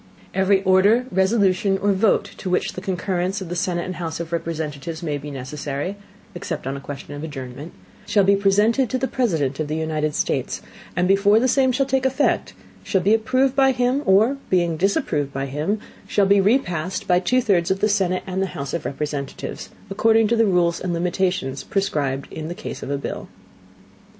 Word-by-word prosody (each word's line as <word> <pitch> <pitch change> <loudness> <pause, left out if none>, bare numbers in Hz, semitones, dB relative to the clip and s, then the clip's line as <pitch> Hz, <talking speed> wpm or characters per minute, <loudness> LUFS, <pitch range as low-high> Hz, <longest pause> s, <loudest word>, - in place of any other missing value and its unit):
Every 190 0 +3
Order, 200 +6 +4
Resolution, 190 0 +2
or 200 +1 +1
Vote 200 +3 +2
to 185 - -5
which 180 - 0
the 185 - -6
Concurrence 185 0 -1
of 190 -3 -7
the 175 - -3
Senate 175 0 -1
and 185 -2 -5
House 165 -2 -4
of 170 -1 -5
Representatives 160 -1 -4
may 150 -3 -2
be 145 +1 -8
necessary 145 +5 -4 0.4
(except 175 - -5
on 135 +1 -2
a - - -5
question 140 0 -8
of 145 +1 -7
Adjournment) 140 0 -7 0.4
shall 205 - +3
be 200 +1 +5
presented 210 +5 +3
to 260 - 0
the 265 +1 -1
President 160 - 0
of 155 - -1
the 155 - -2
United 155 -1 -1
States; - - -1 0.3
and 180 +1 +2
before 200 +2 +5
the 255 - +2
Same 260 0 +3
shall 275 +2 +1
take 265 0 0
Effect, 265 +2 0 0.3
shall 190 - +1
be 200 +5 +3
approved 255 +4 +2
by 270 -1 +4
him, 250 +2 +1
or 220 +8 +4
being 175 -3 +2
disapproved 165 - 0
by 135 0 -3
him, 150 +10 -2 0.3
shall 205 - +2
be 200 0 +5
repassed 185 - 0
by 180 -1 +4
two 250 +8 +2
thirds 190 -8 +2
of 190 - +1
the 210 - +3
Senate 190 -3 +1
and 190 0 -2
House 155 -7 -5
of 170 - -3
Representatives, 140 -1 -4 0.2
according 220 +2 +4
to 235 - +2
the 225 -1 +3
Rules 175 -3 +2
and 180 -2 -2
Limitations 175 -5 -1
prescribed 145 -9 -1
in 155 0 -5
the 175 - -5
Case 215 - -7
of - - -6
a 140 - 0
Bill. 140 - -5
185 Hz, 195 wpm, -22 LUFS, 155-205 Hz, 0.4 s, be